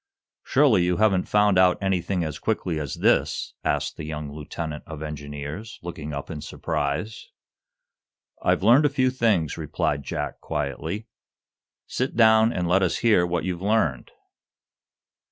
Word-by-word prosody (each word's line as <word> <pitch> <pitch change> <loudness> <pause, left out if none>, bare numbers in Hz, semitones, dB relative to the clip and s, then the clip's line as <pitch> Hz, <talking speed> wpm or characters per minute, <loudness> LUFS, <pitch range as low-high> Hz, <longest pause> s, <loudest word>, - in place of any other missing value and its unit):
"Surely, 130 -10 +4
you 90 0 +1
haven't 100 -4 +2
found 105 -2 +4
out 90 -1 +5
anything 95 -2 0
as 75 -2 -4
quickly 90 -7 -1
as 70 -4 -4
this?" - - +1
asked - - -1
the - - -6
young 75 -1 -5
lieutenant 75 +1 -6
of 80 -1 -7
engineers, 75 - -7
looking 80 -3 -6
up 70 +2 -5
in 75 -2 -6
surprise. 75 +13 -3 1.1
"I've - - +1
learned 125 +8 +6
a - - -1
few 130 -2 +1
things," 110 - +1
replied 70 -1 -1
Jack, - - -4
quietly. 75 +9 -3 0.8
"Sit 130 +1 -3
down, 110 -1 +5
and 90 -5 -2
let 95 +3 +3
us 95 - +1
hear 100 -6 +4
what 85 0 -1
you've 90 -2 -3
learned." 95 - 0
90 Hz, 145 wpm, -24 LUFS, 75-110 Hz, 1.1 s, learned